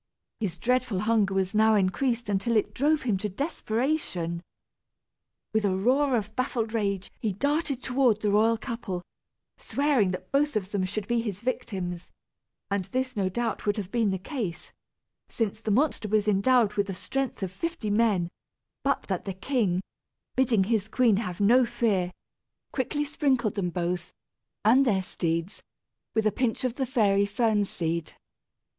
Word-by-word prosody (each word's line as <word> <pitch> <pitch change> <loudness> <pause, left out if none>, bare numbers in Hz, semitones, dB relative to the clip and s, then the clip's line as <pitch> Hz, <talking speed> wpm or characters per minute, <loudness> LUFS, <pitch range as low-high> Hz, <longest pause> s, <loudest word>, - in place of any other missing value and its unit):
His 190 -6 -2
dreadful 245 -1 +1
hunger 210 -3 +2
was 190 0 0
now 220 +1 +5
increased 230 +5 +1
until 205 +3 +1
it 210 - 0
drove 300 +3 +2
him 220 -6 +1
to 210 - -2
desperation. 220 - -2 1.1
With 220 0 +2
a 190 -2 +1
roar 260 +5 +3
of 215 0 -4
baffled 240 -3 -1
rage 200 -4 -1
he 215 -4 -1
darted 285 - 0
toward 250 -4 +2
the 210 - +1
royal 225 +2 +4
couple, 220 -7 -5 0.5
swearing 280 -9 +1
that 185 0 -5
both 290 -1 +2
of 200 -2 -2
them 195 -2 0
should 205 +2 -4
be 235 -1 +1
his 205 -4 -4
victims; 185 -8 -3 0.6
and 200 -2 0
this 255 +3 -2
no 195 -3 +1
doubt 225 +2 -2
would 205 - +2
have 200 -2 -4
been 230 -4 +2
the 190 - 0
case 185 - -5 0.6
since 220 -2 -2
the 220 - -3
monster 245 0 +2
was 215 0 +1
endowed 210 +2 +4
with 200 -1 0
the 195 - -4
strength 270 0 -3
of 185 - -2
fifty 235 - -3
men 205 -6 +2 0.5
but 280 0 +1
that 190 -3 -3
the 195 -2 -4
king, 190 -4 0 0.5
bidding 240 -6 +3
his 215 0 0
queen 225 -2 +3
have 180 -5 -3
no 235 +6 +5
fear, 200 -7 0 0.6
quickly 290 +3 -1
sprinkled 275 -7 +1
them 190 -4 -1
both, 175 +1 -2 0.5
and 250 +5 +6
their 200 -7 +2
steeds, 170 +1 -2 0.5
with 220 -1 +2
a 215 - +4
pinch 245 0 -1
of 255 -2 0
the 265 0 -2
fairy 200 -6 +3
fern 210 0 +2
seed. 170 -4 -3
215 Hz, 165 wpm, -27 LUFS, 190-250 Hz, 1.1 s, and